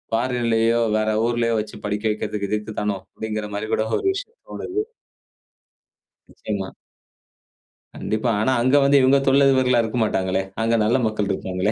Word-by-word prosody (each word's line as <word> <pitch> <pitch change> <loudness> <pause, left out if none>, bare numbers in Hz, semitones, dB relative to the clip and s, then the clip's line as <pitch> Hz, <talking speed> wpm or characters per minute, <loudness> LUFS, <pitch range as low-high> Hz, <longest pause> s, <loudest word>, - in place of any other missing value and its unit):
பாரின்லயோ, 115 -1 +1 0.2
வேற 110 0 0 0.2
ஊர்லயோ 120 -1 0
வச்சு 110 - -9
படிக்க 105 +1 -2
வெக்கிறது 105 -1 -3
இதுக்கு 105 0 -3
தானோ, 105 -2 -1 0.2
அப்படிங்கிற 110 -1 -4
மாரி 110 +2 -3
கூட 110 - 0
ஒரு - - -8
விஷயம் 400 +5 -8
தோணுது. 415 +3 -3 1.4
நிச்சயமா. 100 -3 -5 1.3
கண்டிப்பா. 110 +2 -1
ஆனா 130 - +2
அங்க 130 +3 +3
வந்து 140 0 +5
இவங்க 130 +2 +5
தொழில் 140 +1 +5
அதிபர்களா 130 -2 +3
இருக்க 110 +2 -3
மாட்டாங்களே. 95 -3 0 0.2
அங்க 115 +1 +2
நல்ல 120 +4 +3
மக்கள் 105 -2 -2
இருப்பாங்களே. 95 +3 -1
110 Hz, 145 wpm, -22 LUFS, 105-125 Hz, 1.4 s, வந்து